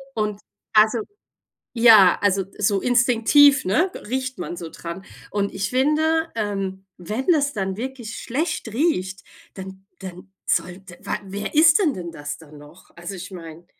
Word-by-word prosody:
Und, 210 -2 -2 0.3
also 215 +2 +4 0.7
ja, 220 -6 +7
also, 195 -2 +1
so 200 -1 +1
instinktiv, 250 +3 +4
ne, 335 - +1 0.2
riecht 260 +1 -3
man 175 - -5
so 165 -1 -7
dran. 170 +4 -8 0.3
Und 200 -1 -2
ich 195 +3 -3
finde, 315 +5 +1
ähm, 195 -3 -3
wenn 215 - -5
das 290 -5 +3
dann 190 -2 -3
wirklich 245 -1 -6
schlecht 270 -2 -3
riecht, 190 - -1 0.3
dann 190 0 -10
dann 190 0 -10
sollte 180 +1 -3
wa - - -3
wer 200 +7 -6
isst 320 +3 +6
denn 315 -9 +2
denn 170 -2 -7
das 145 -2 -7
dann 150 -2 -15
noch? 150 +5 -17
Also, 175 +3 -7
ich 180 - -9
meine, 165 -1 -10
205 Hz, 150 wpm, -22 LUFS, 185-255 Hz, 0.7 s, ja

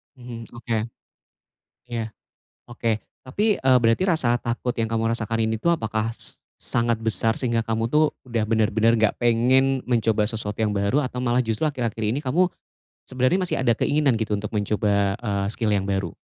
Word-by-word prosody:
Mhm, 120 -3 -9
oke. 115 -1 -2 1.1
Ya, 115 -2 -4 0.5
oke. 115 -2 -1 0.2
Tapi, 205 +11 0
eee, 130 -1 +5
berarti 115 +6 +2
rasa 120 -8 +2
takut 120 +1 -2
yang 115 -1 -2
kamu 115 0 0
rasakan 115 0 -1
ini 110 0 -1
tuh, 170 0 +3
apakah 110 -3 -2
s 115 - -4 0.2
sangat 115 -1 0
besar 110 0 +1
sehingga 115 -3 0
kamu 115 0 -1
tuh, 150 +4 +3 0.2
udah 115 -3 -1
benar-benar 110 +1 +2
enggak 110 -1 +2
pengen 130 +3 +3
mencoba 110 -3 +1
sesuatu 110 -2 -3
yang 105 -2 0
baru 100 +7 +1
atau 125 -3 -3
malah 120 0 +2
justru 115 +1 -1
akhir-akhir 120 -7 -2
ini 130 - -1
kamu 170 +6 +1 0.6
sebenarnya 130 +7 +1
masih 185 -2 0
ada 120 -2 +3
keinginan 145 -5 +2
gitu 110 -1 -1
untuk 105 +1 -4
mencoba, 100 -1 +1
eee, 100 -4 -1
skill 110 -1 0
yang 100 -2 +1
baru? 95 -3 -1
115 Hz, 170 wpm, -23 LUFS, 110-125 Hz, 1.1 s, eee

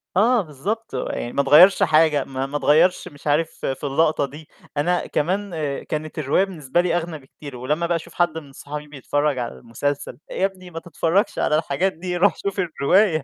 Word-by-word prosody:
آه 230 +3 +4
بالضبط، 190 +6 -5
هو - - -2
يعني 120 - -4
ما 140 - +2
اتغيّرش 155 +8 +7
حاجة 155 -3 +4
ما 135 0 -4
ما 145 +2 -3
اتغيّرش 155 +6 +3
مش 145 +1 -11
عارف 155 +3 +2 0.2
في 135 +2 -3
اللقطة 145 +1 +2
دي. 150 +3 -11 0.3
أنا 175 +4 +1
كمان 185 +5 -1 0.3
كانت 155 +1 -5
الرواية 150 +6 +2
بالنسبة 170 -4 -1
لي 175 -1 +1
أغنى 165 -2 -4
بكتير 140 0 -12
ولمّا 150 +7 -1
بقى 170 - +1
أشوف 165 - -6
حد 170 -2 +1
من 145 -3 -8
أصحابي 150 +2 -8
بيتفرّج 145 0 -1
على 120 - -3
المسلسل، 135 - -3
"يا 190 - +1
ابني 185 -2 -6
ما 165 - -5
تتفرّجش 175 +5 0
على 150 - +2
الحاجات 165 +5 0
دي 180 +2 -4
روح 200 +4 +3
شوف 200 0 -4
الرواية." 175 +1 +2
155 Hz, 190 wpm, -22 LUFS, 145-180 Hz, 0.3 s, اتغيّرش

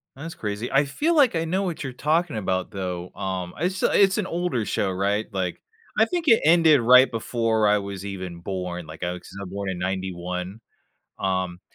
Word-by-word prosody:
Ah, 135 - -12
that's 165 0 -7
crazy. 105 +2 -4
I 140 +2 +4
feel 310 - 0
like 275 - +5
I 165 0 0
know 185 +4 0
what 175 -5 -3
you're 135 - -4
talking 155 +1 0
about, 95 -3 -2
though. 90 -2 -4
Um, 95 -2 -4
it's 185 +3 -1
a - - +3
it's 195 -1 +5
an 210 - 0
older 170 - -1
show, 100 -1 0
right? 100 +3 0
Like, 95 -3 -3 0.4
I - - +6
think 350 -3 -3
it 230 -5 +6
ended 160 -3 +6
right 125 +3 +7
before 115 -1 0
I 105 0 +4
was 100 -1 -6
even 95 -3 -6
born, 90 -1 -4
like, 80 +3 -9
I 90 0 -1
wicks 90 - -11
a - - -5
born 100 +1 -4
in 90 -2 -4
'91. 90 +1 -4 0.6
Um, 95 -2 -1
100 Hz, 205 wpm, -24 LUFS, 95-155 Hz, 0.6 s, right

